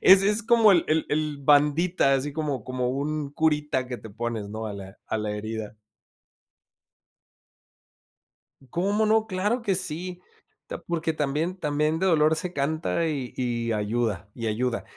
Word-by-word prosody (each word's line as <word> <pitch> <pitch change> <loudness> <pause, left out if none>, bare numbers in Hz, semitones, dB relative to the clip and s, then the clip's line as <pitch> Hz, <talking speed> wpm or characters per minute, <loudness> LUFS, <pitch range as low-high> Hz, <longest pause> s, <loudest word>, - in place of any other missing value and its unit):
ese 195 +1 +7
es 210 +2 0
como 225 -2 +6
el 175 - +3
el 155 0 +1
el 150 -1 -1
bandita, 150 +2 +3
así 140 +2 -1
como 145 -6 -3
como 130 -1 -2
un 145 +2 -2
curita 150 -3 0
que 125 -1 -5
te 110 - -11
pones, 115 -1 -4
¿no?, 110 +1 -5
a 105 - -4
la 95 0 -10
a 110 - -2
la 105 0 -2
herida. 110 +1 -5 3.0
¿Cómo 200 +5 +1
no?, 220 0 +3
¡claro 210 +5 0
que 200 -4 0
sí!, 180 0 -3 0.4
ta - - -7
Porque 165 -1 -2
también 155 +5 -1
también 150 0 0
de 190 - +2
dolor 155 -2 +4
se 180 +2 -2
canta 160 +3 0
y 135 -6 -3
y 120 -2 -1
ayuda 105 -1 -1
y 115 -1 -4
ayuda. 115 +2 -1
150 Hz, 155 wpm, -26 LUFS, 120-175 Hz, 3.0 s, ese